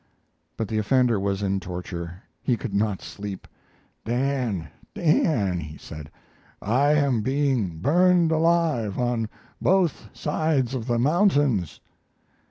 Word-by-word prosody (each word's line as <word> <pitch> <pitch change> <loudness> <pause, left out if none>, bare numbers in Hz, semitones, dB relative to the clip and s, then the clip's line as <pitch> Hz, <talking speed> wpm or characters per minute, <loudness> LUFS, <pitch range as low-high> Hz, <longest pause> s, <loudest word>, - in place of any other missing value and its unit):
But 110 - -2
the 110 +1 -1
offender 120 0 +2
was 100 0 -1
in 100 0 0
torture; 90 0 -6 0.2
he 125 - +1
could 115 -4 -6
not 100 -1 0
sleep. 100 -2 -7 0.6
"Dan, 120 - -1 0.3
Dan," 115 - +2
he 75 -1 -8
said, 75 -2 -9 0.5
"I 135 +8 +2
am 140 -6 +2
being 130 - 0
burned 175 - +3
alive 160 - +2
on 120 -3 0 0.3
both 175 - +1
sides 150 -4 0
of 125 -3 -4
the 120 -1 +1
mountains." 145 - +2
120 Hz, 120 wpm, -25 LUFS, 100-145 Hz, 0.6 s, burned